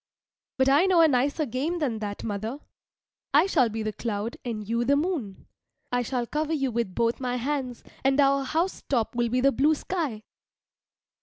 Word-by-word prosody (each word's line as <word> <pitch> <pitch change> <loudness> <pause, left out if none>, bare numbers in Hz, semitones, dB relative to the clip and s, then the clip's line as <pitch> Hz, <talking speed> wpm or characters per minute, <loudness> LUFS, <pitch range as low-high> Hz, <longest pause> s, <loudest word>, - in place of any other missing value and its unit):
But 265 0 +3
I 290 +7 +5
know 360 -3 +5
a 325 - +7
nicer 285 +3 +1
game 280 +8 -2
than 260 -9 -1
that, 205 -1 -5
mother. 220 +4 -3 0.8
I 305 +5 +6
shall 255 -11 +3
be 220 0 -4
the 215 0 -2
cloud 220 0 -3
and 215 -4 -4
you 235 +2 0
the 275 +4 +3
moon. 285 - -2 0.5
I 245 0 +1
shall 245 0 -2
cover 305 +5 -2
you 275 -4 0
with 230 -5 -2
both 230 0 +1
my 250 -1 -2
hands, 255 -1 -3 0.2
and 270 +1 +2
our 275 -1 +4
house 325 +8 -1
top 235 -5 +1
will 240 -1 +1
be 250 +2 +1
the 275 +1 +4
blue 290 +6 +3
sky. 295 - -3
255 Hz, 185 wpm, -26 LUFS, 230-290 Hz, 0.8 s, a